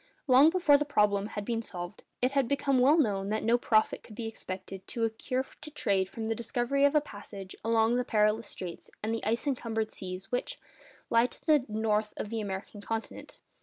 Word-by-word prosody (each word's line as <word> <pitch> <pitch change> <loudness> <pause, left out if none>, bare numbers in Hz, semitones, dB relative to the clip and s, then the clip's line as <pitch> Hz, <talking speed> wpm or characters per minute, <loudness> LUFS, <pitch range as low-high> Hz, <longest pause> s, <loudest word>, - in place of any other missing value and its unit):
Long 270 +2 +7
before 325 -5 +4
the - - +2
problem 210 -7 +2
had 205 -2 -5
been 230 0 -1
solved, 175 -3 -7 0.2
it 255 - +3
had 275 -3 +2
become 275 -1 +2
well 280 +6 +6
known 200 -9 +1
that 215 +1 -1
no 230 +2 +4
profit 220 -2 +2
could 215 - -13
be 230 - -4
expected 195 -3 -7
to 230 - -3
accrue 240 +4 -1 0.2
to 305 - -6
trade 200 -10 0
from 225 - -6
the 225 0 0
discovery 245 +4 +1
of 285 +2 +3
a 300 - +6
passage 205 -6 -9
along 225 +1 +3
the 250 - +1
perilous 215 -1 +2
straits 175 -2 -8
and 220 +1 0
the 230 - -3
ice 230 +6 0
encumbered 225 -5 -1
seas 185 +1 -7
which, 245 - -2 0.5
lie 230 +1 +5
to - - -15
the 300 -5 +4
north 215 -1 0
of 210 - -4
the 225 -1 -1
American 200 +1 -5
continent. 225 +2 -5
225 Hz, 205 wpm, -30 LUFS, 210-255 Hz, 0.5 s, Long